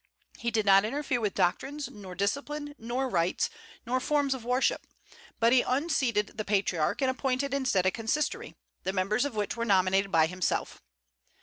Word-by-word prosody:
He 235 - -1
did 220 -2 0
not 195 0 +6
interfere 260 +1 -1
with 210 -3 -1
doctrines, 270 +10 0
nor 190 -3 -10
discipline, 290 - -2
nor 245 +4 -2
rites, 175 -6 0 0.3
nor 250 +2 0
forms 285 0 +1
of 260 -3 -7
worship; 250 +2 0 0.5
but 230 +1 +4
he 255 - +6
unseated 255 -7 0
the - - 0
Patriarch, 195 - 0
and 260 - +3
appointed 265 +1 -1
instead 260 -10 +1
a 185 - +4
consistory, 235 +9 -2 0.3
the 190 - -2
members 200 +7 +1
of 280 -5 -4
which 210 -1 -2
were 235 - -2
nominated 195 -2 +2
by 160 -1 +5
himself. 180 +2 -2
230 Hz, 170 wpm, -29 LUFS, 195-270 Hz, 0.5 s, not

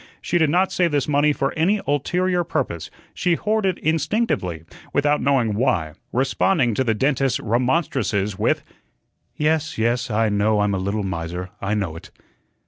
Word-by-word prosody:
She 175 - 0
did 160 -2 +3
not 180 +4 +2
save 175 -3 +1
this 145 -3 0
money 150 0 +3
for 135 -1 -1
any 190 +7 +2
ulterior 175 +6 +1
purpose, 85 - -3 0.2
she 175 -1 +1
hoarded 210 -1 0
instinctively, 160 - -1 0.3
without 145 +1 +2
knowing 125 -5 +2
why, 100 -9 0 0.2
responding 130 +1 +1
to 130 - +1
the 115 -3 +1
dentist's 135 +2 +1
remonstrances 120 - 0
with: - - 0 0.7
"Yes, 160 +1 0
yes, 120 +3 0
I 110 0 +1
know 105 +1 +2
I'm 105 -1 +1
a 95 - -1
little 100 +3 -2
miser, 90 0 -4
I 105 +2 -1
know 95 -6 -2
it." 80 - -11
130 Hz, 155 wpm, -22 LUFS, 105-160 Hz, 0.7 s, did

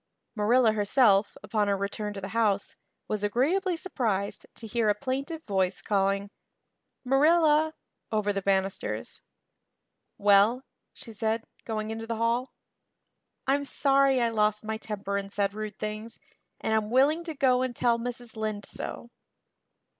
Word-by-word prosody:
Marilla 230 +2 +4
herself, 210 -1 +3
upon 210 -3 0
her 200 -1 +1
return 205 +1 -3
to 200 - -7
the 195 - -5
house, 210 -2 0 0.3
was 210 -1 -2
agreeably 330 - +1
surprised 215 - -2
to 230 - -10
hear 225 0 +1
a 205 - +3
plaintive 275 +7 -4
voice 190 -2 0
calling, 200 0 0 0.7
"Marilla" 310 +3 +4 0.4
over 210 -2 +1
the 195 - -2
banisters. 195 0 -1 1.0
"Well?" 205 +5 +4 0.3
she 225 - -11
said, 220 +2 -1 0.2
going 215 -1 -3
into 225 0 -5
the 230 - -2
hall. 235 +3 0 0.9
"I'm 280 +2 +2
sorry 275 -1 +3
I 235 -1 +2
lost 210 -1 +1
my 220 0 -3
temper 205 -2 -4
and 200 0 -5
said 200 -1 0
rude 215 -1 -6
things, 215 +2 -5 0.4
and 220 - -1
I'm 215 -1 +1
willing 285 +7 +3
to 320 -2 -5
go 255 -2 +3
and 255 -2 -2
tell 235 0 +2
Mrs. 245 -1 -5
Lynde 215 -2 -3
so." 235 - -6
220 Hz, 145 wpm, -28 LUFS, 205-255 Hz, 1.0 s, Marilla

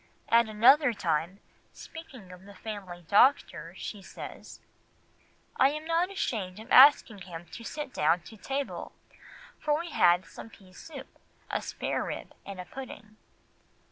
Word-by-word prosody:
At 230 -1 +4
another 250 +5 +5
time, 185 -1 -2 0.3
speaking 260 - -11
of 180 +1 -13
the 200 0 -13
family 185 -5 -8
doctor, 180 - +3
she 205 - -6
says— - - -10 1.0
"I 270 +2 +4
was 305 +1 -5
not 335 +2 +1
ashamed 215 - -3
of 220 - -12
asking 260 -6 +7
him 175 -2 -9
to 230 - -9
sit 295 +2 -6
down 165 +4 +2
to 220 - -13
table, 270 +6 -4 0.7
for 300 -1 +1
we 340 0 -6
had 175 +1 +4
some - - -11
pease 190 -3 -17
soup, 290 -5 -11 0.3
a - - -1
sparerib, - - -4 0.2
and 195 -2 -7
a 180 - -6
pudding." 220 -3 -10
215 Hz, 140 wpm, -29 LUFS, 185-275 Hz, 1.0 s, asking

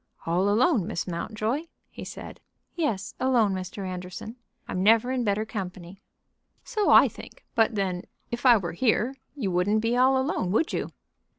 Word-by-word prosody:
"All 180 +4 +1
alone, 225 - +3
Miss - - -3
Mountjoy?" 215 - -3 0.3
he - - -9
said. - - -9 0.4
"Yes, 230 - -2
alone, 240 -6 +3
Mr. 190 +1 -5
Anderson. 185 +5 -7 0.3
I'm 185 - -2
never 225 +5 +4
in 255 -2 0
better 210 0 0
company." 190 -3 -7 0.6
"So 430 -4 0
I - - +8
think; - - -12
but 225 0 +2
then 185 -3 -2 0.3
if 235 - -4
I 245 -3 +7
were 175 -4 -3
here 245 +5 +1 0.2
you 220 -10 -2
wouldn't 195 +5 +2
be 230 +2 +1
all 260 +1 +4
alone, 260 - -1
would 315 +9 +1
you?" - - -2
215 Hz, 165 wpm, -26 LUFS, 185-245 Hz, 0.6 s, I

